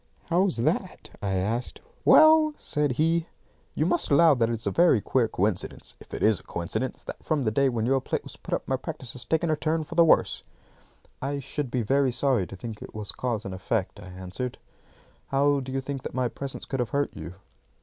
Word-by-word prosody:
"How's 180 0 +2
that?" 115 - -1
I 100 -1 -1
asked. 110 +6 -2 0.3
"Well," 310 -1 +7
said 150 -3 0
he, 165 +4 +1 0.5
"you 155 - +1
must 175 0 +2
allow 160 +2 +6
that 115 -4 +1
it - - 0
is 115 - -6
a - - +1
very 170 -8 +5
queer 120 +4 +1
coincidence 100 -2 -2
if - - -16
it - - -4
is 110 -3 +4
a - - -19
coincidence 110 +9 -3
that - - -8
from 155 -4 0
the 110 - +1
day 135 +4 +3
when 115 -3 -1
your 135 +2 +2
plate - - -2
was - - -9
put - - -3
up - - -6
my - - +1
practice 120 -3 -7
has 125 -2 -9
taken 160 0 +1
a - - +3
turn 160 +1 -1
for - - -9
the 170 - +6
worse." 165 - +3 0.8
"I 140 +2 -2
should 140 0 -4
be 125 -1 -1
very 135 +3 +2
sorry 125 -6 +1
to - - -9
think 110 +1 -7
it - - -10
was 105 -1 -4
cause 115 -3 -3
and 95 - -5
effect," 100 +2 -2
I 100 - -10
answered. 95 +7 -5 0.7
"How 140 +1 +2
do 130 -1 -6
you 135 0 -1
think 135 0 -5
that - - -7
my 130 -1 +1
presence 140 +2 -6
could 135 - -4
have 125 - 0
hurt 140 0 -1
you?" 90 - -8
130 Hz, 220 wpm, -26 LUFS, 110-150 Hz, 0.8 s, Well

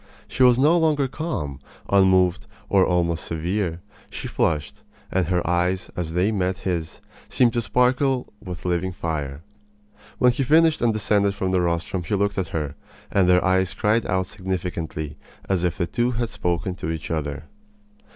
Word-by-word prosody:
She - - -5
was 125 -1 +7
no 150 +6 +4
longer 150 -4 +2
calm, 125 - -4 0.3
unmoved, 95 -2 +3 0.2
and 95 -2 +5
almost 85 -2 +1
severe. 85 +1 -2 0.3
She - - -6
flushed, 75 -3 -1 0.3
and 90 -3 +1
her 90 -1 0
eyes 90 +2 0
as 80 -2 -3
they 90 +5 +2
met 95 -3 0
his 85 -4 -3 0.3
seemed 120 -2 +3
to 120 - +1
sparkle 125 +3 +1
with 90 -4 -7
living 90 +1 0
fire. 75 -4 -4 0.7
When 125 - +5
he 120 - -2
finished 160 +4 +4
and 120 -1 +3
descended 105 -2 +1
from 95 -1 -1
the 90 -1 +2
rostrum 85 +2 -1
he 85 +5 -2
looked 100 0 0
at 90 - -1
her, 75 -4 -3 0.4
and 95 -2 +3
their 90 +1 +4
eyes 95 0 +2
cried 110 +2 +1
out 95 0 +1
as 95 - -6
significantly 85 -6 -4 0.3
as 95 -3 0
if 90 +1 0
the 90 - 0
two 120 +7 0
had 115 0 -2
spoken 90 0 -1
to 80 - -4
each 80 -1 -4
other. 75 -3 -3
95 Hz, 170 wpm, -23 LUFS, 85-110 Hz, 0.7 s, was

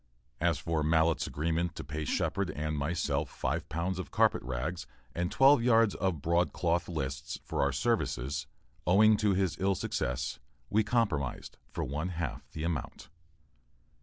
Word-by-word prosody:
As - - +2
for 80 -2 -1
Mallett's 80 +1 +2
agreement 85 +3 -1
to - - -6
pay 75 +3 -4
Shepard 100 +5 0
and 75 0 -2
myself 75 -1 -1
five - - -3
pounds 85 +4 -2
of 90 - -5
carpet - - +3
rags 65 +9 -4 0.3
and 90 +2 -1
twelve 135 +3 +6
yards 115 -3 +4
of 90 -7 -1
broadcloth 85 0 +1
"lists," 70 -5 -3
for - - -1
our 70 - +3
services, 70 - -1 0.4
owing 110 +4 +6
to 105 -3 +2
his 90 -6 0
ill 95 +1 +2
success, 65 -5 -2 0.3
we 110 +2 +4
compromised 100 - -1
for - - -3
one 75 +6 -2
half 85 -2 -4
the 80 - -5
amount. 80 -6 -4
85 Hz, 150 wpm, -31 LUFS, 75-95 Hz, 0.4 s, twelve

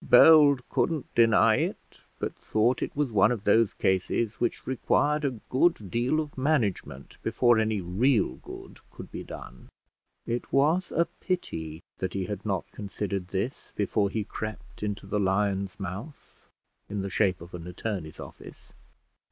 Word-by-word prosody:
Bold 140 -1 +7
couldn't 145 +2 -1
deny 115 -1 +5
it, - - -4 0.2
but - - -3
thought 115 +4 +1
it - - -3
was 145 -4 0
one 105 +1 +4
of 115 -5 -3
those 115 -1 +3
cases 95 +4 0
which 120 - -1
required 145 +3 +1
a 130 -5 -1
good 130 - +2
deal 125 +6 +1
of 150 -2 -4
management 115 - -1
before 120 -2 +3
any 110 -2 0
real 95 - +1
good - - -11
could - - -11
be - - -6
done. 60 - -10 0.6
It 120 +1 -3
was 155 +7 +2
a 170 - +2
pity 80 - -4 0.2
that 95 -1 -2
he 95 -1 -1
had 105 +2 -5
not 95 -5 -1
considered 100 -2 -4
this 100 +8 -4
before 100 0 +1
he 110 +1 -2
crept 110 +1 -7
into 105 -1 -3
the 105 +2 -1
lion's 95 0 0
mouth, 100 - -8 0.4
in 100 -1 -3
the 100 - -3
shape 95 -3 +2
of 85 +2 -12
an 85 -1 -7
attorney's 90 -3 -5
office. - - -12
105 Hz, 155 wpm, -27 LUFS, 95-130 Hz, 0.6 s, Bold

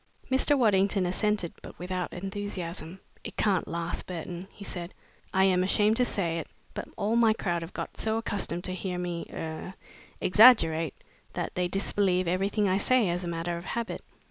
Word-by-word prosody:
Mr. 275 +2 +4
Waddington 200 -5 +3
assented, 195 -1 0
but - - -11
without 180 0 -3
enthusiasm. 185 -3 -5 0.2
"It - - -8
can't 195 -5 +2
last, 170 0 -3
Burton," 180 +1 -6
he 200 - -11
said. 175 -1 -6 0.4
"I 190 - +3
am 185 -1 +4
ashamed 210 +3 +3
to 250 - +4
say 170 -7 -1
it, 160 - -6 0.3
but - - -5
all 215 +2 +1
my 230 -2 +5
crowd 175 -6 -1
have 165 +2 -7
got - - -6
so 220 0 +2
accustomed 200 -6 -2
to 185 - -3
hear 185 0 -3
me 175 -1 -3
er 160 +4 -5 0.4
exaggerate, 165 - +6 0.4
that - - -3
they 180 0 0
disbelieve 185 -1 +1
everything 195 +4 +1
I 190 +1 +2
say 245 -2 +3
as 175 +1 -2
a - - -4
matter 170 0 -2
of 170 - -8
habit. 235 +2 -3
185 Hz, 175 wpm, -28 LUFS, 175-205 Hz, 0.4 s, exaggerate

